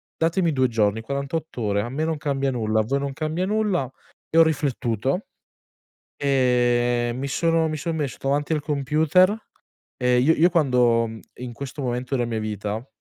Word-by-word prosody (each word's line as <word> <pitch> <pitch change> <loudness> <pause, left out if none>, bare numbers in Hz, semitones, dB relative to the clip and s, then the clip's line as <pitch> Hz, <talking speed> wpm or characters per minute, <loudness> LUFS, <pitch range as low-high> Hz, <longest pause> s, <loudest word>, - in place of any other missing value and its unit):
datemi 165 +1 +1
2 130 -2 +2
giorni, 110 -2 +1
48 140 +3 -4
ore, 100 -2 +1
a 115 - -4
me 140 +5 -2
non 160 -1 -1
cambia 140 -2 -1
nulla, 110 -3 +1
a - - -1
voi 135 +6 -1
non 140 0 -3
cambia 155 +4 -2
nulla. 205 - 0 0.4
E 165 - 0
ho 165 - +9
riflettuto, 135 - -1 0.9
ehm, 120 -3 +2
mi 140 +1 -3
sono 165 +2 +1
mi 155 - -3
son 160 +2 -3
messo 145 -4 -3
davanti 145 +3 0
al 150 - -2
computer. 155 +6 +3 0.7
Ehm, 125 -1 +3
io 160 +5 +4
io, 170 +3 +4
quando 125 -7 +3 0.3
in 125 0 -7
questo 140 +3 -7
momento 125 +1 -2
della 120 -2 0
mia 115 -1 -2
vita, 105 +2 -4
135 Hz, 170 wpm, -23 LUFS, 120-155 Hz, 0.9 s, ho